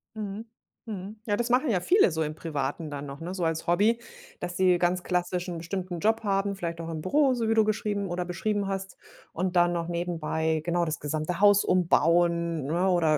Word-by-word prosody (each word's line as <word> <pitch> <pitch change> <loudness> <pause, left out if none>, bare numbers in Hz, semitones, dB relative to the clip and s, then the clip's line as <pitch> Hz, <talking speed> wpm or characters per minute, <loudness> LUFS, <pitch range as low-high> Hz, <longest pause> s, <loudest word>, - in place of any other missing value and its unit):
Mhm, 210 +1 -5 0.4
mhm. 210 0 -7
Ja, 205 -2 0
das 240 0 -1
machen 255 +2 +3
ja 190 -5 +2
viele 360 - +4
so 160 0 0
im 155 0 -4
Privaten 150 0 -3
dann 145 0 -5
noch, 140 +1 -8
ne, 175 +3 -5
so 180 -3 -3
als 160 0 -1
Hobby, 210 +7 +3 0.4
dass 175 0 -5
sie 185 -1 +4
ganz 180 +1 +1
klassisch 180 0 -1
'n 170 - -4
bestimmten 180 0 -4
Job 220 +4 +1
haben, 200 0 0
vielleicht 170 -2 -4
auch 165 - -6
im 160 -1 -4
Büro, 270 - +3
so 230 -2 -1
wie - - +4
du 220 -1 +5
geschrieben 210 -2 -1
oder 175 0 -3
beschrieben 205 +3 -1 0.7
und 185 +1 -2
dann 175 0 +4
noch 170 -1 -2
nebenbei 160 -2 -1
genau 175 0 +1
das 155 -1 -3
gesamte 155 +4 -3
Haus 205 0 +6
umbauen, 170 -3 +2
ne, 175 +6 +1
oder 160 -4 +3
175 Hz, 205 wpm, -27 LUFS, 165-200 Hz, 0.7 s, Haus